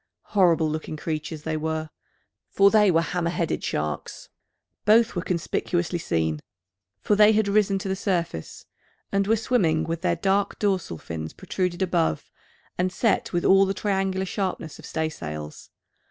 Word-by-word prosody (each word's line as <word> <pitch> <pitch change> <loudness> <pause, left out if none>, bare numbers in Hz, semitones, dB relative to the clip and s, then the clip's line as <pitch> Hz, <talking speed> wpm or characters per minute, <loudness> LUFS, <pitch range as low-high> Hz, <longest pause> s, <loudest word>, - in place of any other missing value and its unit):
Horrible 170 -5 +4
looking 155 0 -4
creatures 155 0 -4
they 160 -1 -2
were: 155 0 -3 0.6
for 200 0 +5
they 210 -2 +5
were 165 -2 +3
hammer 170 0 -1
headed 170 -1 -2
sharks! 75 -2 -4 0.5
Both 220 +1 +4
were 175 - -1
conspicuously 175 0 -1
seen: 80 - -1 0.6
for 210 - +2
they 210 +1 +6
had 215 -1 +2
risen 200 -1 +2
to 195 +1 -5
the 190 - 0
surface, 170 - -3 0.5
and 200 0 +1
were 225 - +4
swimming 175 -9 +1
with 165 0 -3
their 175 -2 +1
dark 195 +3 0
dorsal 190 - -1
fins 80 0 -6
protruded 180 -1 -2
above, 170 - 0 0.5
and 185 +1 +1
set 225 +4 +1
with 175 -1 -1
all 195 0 +6
the 195 - -1
triangular 190 -2 -1
sharpness 185 -5 -4
of - - -10
staysails. 75 - -5
175 Hz, 155 wpm, -25 LUFS, 160-195 Hz, 0.6 s, they